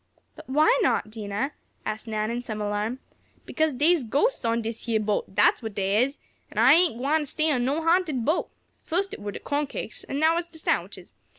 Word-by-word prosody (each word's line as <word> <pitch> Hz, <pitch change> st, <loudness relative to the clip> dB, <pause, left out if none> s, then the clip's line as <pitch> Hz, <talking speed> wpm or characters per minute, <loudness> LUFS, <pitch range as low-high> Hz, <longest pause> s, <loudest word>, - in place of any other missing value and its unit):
"But -, -, -13 dB
why 310 Hz, -, +4 dB
not, 215 Hz, -, +1 dB
Dinah?" 215 Hz, +4 st, -3 dB, 0.3 s
asked 215 Hz, +2 st, -4 dB
Nan, 215 Hz, 0 st, -1 dB
in 240 Hz, +1 st, -2 dB
some 215 Hz, -3 st, -5 dB
alarm. 210 Hz, +3 st, -2 dB, 0.5 s
"Because 315 Hz, 0 st, +1 dB
dey's 300 Hz, +4 st, +3 dB
ghostests 290 Hz, -, +1 dB
on 230 Hz, 0 st, 0 dB
dish 225 Hz, +2 st, -5 dB
yeah 225 Hz, -1 st, +2 dB
boat; 210 Hz, -2 st, -2 dB
dat's -, -, +4 dB
what 220 Hz, -3 st, -6 dB
dey 200 Hz, +2 st, +2 dB
is! 275 Hz, +3 st, 0 dB, 0.3 s
An' -, -, -14 dB
I 240 Hz, +5 st, +7 dB
ain't 335 Hz, -7 st, +4 dB
gwine 295 Hz, +4 st, 0 dB
stay 310 Hz, +2 st, 0 dB
on 245 Hz, -4 st, +1 dB
no 290 Hz, +5 st, 0 dB
ha'nted 330 Hz, -8 st, +2 dB
boat. 315 Hz, +4 st, +1 dB, 0.3 s
Fust 385 Hz, +4 st, -1 dB
it -, -, -8 dB
were 205 Hz, 0 st, -4 dB
de -, -, -6 dB
corn 290 Hz, 0 st, -1 dB
cakes, -, -, -6 dB
an' 275 Hz, -, -4 dB
now 320 Hz, +3 st, +3 dB
it's 345 Hz, -, -6 dB
de 335 Hz, -1 st, -14 dB
sandwiches. -, -, -2 dB
260 Hz, 210 wpm, -26 LUFS, 220-315 Hz, 0.5 s, I